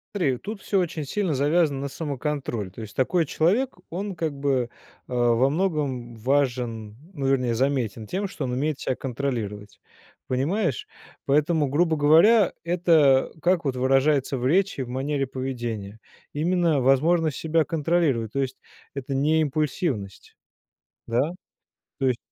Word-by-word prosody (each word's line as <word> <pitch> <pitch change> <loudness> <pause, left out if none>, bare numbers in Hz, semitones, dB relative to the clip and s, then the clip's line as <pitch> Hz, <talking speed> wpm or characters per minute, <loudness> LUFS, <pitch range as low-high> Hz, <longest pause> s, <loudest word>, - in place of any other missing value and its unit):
Смотри, 135 -10 +1
тут 205 - -7
всё 195 - +1
очень 160 -3 -2
сильно 185 +1 -1
завязано 145 0 +2
на 140 - -2
самоконтроль. 140 - -3
То 110 - -10
есть 105 -1 -9
такой 165 +5 +2
человек- 200 - +1
он, 195 +2 -4
как 160 -3 -2
бы, 135 -4 0 0.4
э, - - -5
во 120 +2 +3
многом 145 -8 -1
важен, 120 -4 -1 0.2
ну, 140 -4 -2
вернее, 125 -3 +2
заметен 120 -5 -1
тем, 195 +2 -2
что 150 -7 -5
он 125 - -3
умеет 145 +2 -1
себя 130 - -1
контролировать. 110 -7 -4 0.5
Понимаешь? 145 - -1 0.4
Поэтому, 150 +1 +2
грубо 160 +4 +2
говоря, 170 +9 +5
это 165 -6 +3
как 175 0 +2
вот 130 -2 0
выражается 135 +1 +2
в 125 - -3
речи, 185 -2 +2
в 125 - -5
манере 135 +2 -1
поведения? 120 -6 -5 0.3
Именно 165 -2 +1
возможность 155 +4 +3
себя 160 0 +1
контролировать. 150 -8 0
То 140 - -1
есть 130 0 -3 0.4
это 135 0 -5
не 155 +4 +2
импульсивность. 145 - -2 0.7
Да? 120 +7 +1 0.7
То 135 - +1
есть 125 -2 +1
140 Hz, 140 wpm, -25 LUFS, 125-165 Hz, 0.7 s, говоря